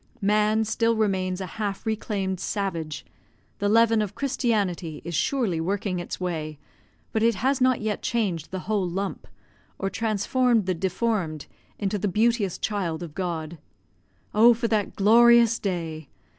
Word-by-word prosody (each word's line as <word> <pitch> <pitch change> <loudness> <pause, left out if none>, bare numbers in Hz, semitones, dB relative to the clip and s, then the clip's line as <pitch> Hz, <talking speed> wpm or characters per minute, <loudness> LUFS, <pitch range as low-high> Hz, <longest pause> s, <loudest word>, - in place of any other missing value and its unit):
Man 215 +1 +2
still 230 +1 +1
remains 190 -3 0
a - - -3 0.2
half 200 -2 -3
reclaimed 205 -4 -2
savage; 165 -8 -3 0.5
the 205 - +1
leaven 225 0 +4
of 205 -1 -4
Christianity 205 - -1
is 170 - -5
surely 185 - 0
working 190 +1 -1
its 175 - -6
way, 160 -4 -3 0.5
but 220 - 0
it 230 0 +3
has 260 +6 0
not 255 -2 +3
yet 215 -1 -2
changed 190 -9 -1
the 185 -1 -5
whole 200 -2 -1
lump, 195 +3 -4 0.5
or 195 0 -2
transformed 225 +1 +1
the 185 - +1
deformed 185 -3 -1 0.3
into 205 0 -1
the 205 - 0
beauteous 215 -1 +1
child 180 -6 -2
of 160 -4 -8
God. 170 -3 -4 0.7
Oh, 230 +3 +6
for 230 +1 -1
that 210 -3 0
glorious 235 +2 +6
day! 165 -6 -4
200 Hz, 145 wpm, -25 LUFS, 180-225 Hz, 0.7 s, Oh